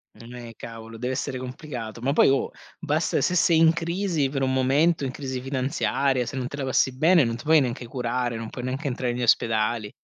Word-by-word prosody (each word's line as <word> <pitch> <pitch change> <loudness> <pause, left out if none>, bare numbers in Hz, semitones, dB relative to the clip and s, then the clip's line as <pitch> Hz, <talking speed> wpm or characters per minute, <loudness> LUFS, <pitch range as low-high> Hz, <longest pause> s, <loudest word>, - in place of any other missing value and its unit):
Non 115 +3 -12
è 120 -2 -9
cavolo, 115 0 -9
deve 125 +2 -2
essere 130 0 -3
complicato, 125 -3 -7
ma 135 +4 0
poi - - +5
oh, 135 - +1 0.3
basta 155 0 0
se 180 - +1
sei 165 -1 +4
in 160 0 +6
crisi 170 -2 -1
per 135 0 -3
un 130 0 +1
momento, 140 +5 +2
in 130 - -3
crisi 130 -2 -5
finanziaria, 135 -1 0
se 145 - -6
non 125 -1 -2
te 140 - -7
la 140 - -3
passi 130 0 +1
bene, 165 +4 +5
non 115 -2 -1
ti 120 - -11
puoi 160 0 +5
neanche 125 -2 -3
curare, 125 0 -2
non 115 -1 -6
puoi 125 - -7
neanche 135 +4 -3
entrare 125 -1 -2
negli 125 +1 -3
ospedali. 110 -2 +1
130 Hz, 220 wpm, -25 LUFS, 120-145 Hz, 0.3 s, in